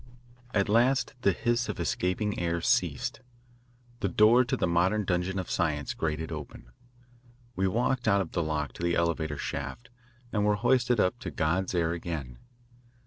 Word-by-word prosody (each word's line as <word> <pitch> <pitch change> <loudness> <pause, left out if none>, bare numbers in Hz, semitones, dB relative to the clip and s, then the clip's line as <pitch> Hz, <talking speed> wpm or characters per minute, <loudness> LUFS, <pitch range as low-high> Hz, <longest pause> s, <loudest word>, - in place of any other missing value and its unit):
At 100 -2 +1
last 125 +6 +3
the 100 - +4
hiss 120 +5 0
of - - -4
escaping 95 +3 -1
air 85 -1 0
ceased. - - 0 0.8
The - - 0
door 110 +7 +5
to 125 - -1
the - - +1
modern 90 +5 +2
dungeon 90 +1 -1
of 95 - -4
science 75 -6 0
grated 80 0 -3
open. 75 -5 -8 0.8
We 95 0 +1
walked 120 +5 0
out 100 - +4
of 95 -5 -3
the 85 - 0
lock 75 -2 -2
to - - -10
the 85 0 +1
elevator 80 -3 0
shaft 120 - -5 0.4
and 105 -2 +1
were 105 0 +3
hoisted 125 +2 +2
up 110 +6 +1
to 120 - -5
God's 90 +3 -1
air 85 -1 +1
again. 80 -8 -5
90 Hz, 165 wpm, -28 LUFS, 85-105 Hz, 0.8 s, door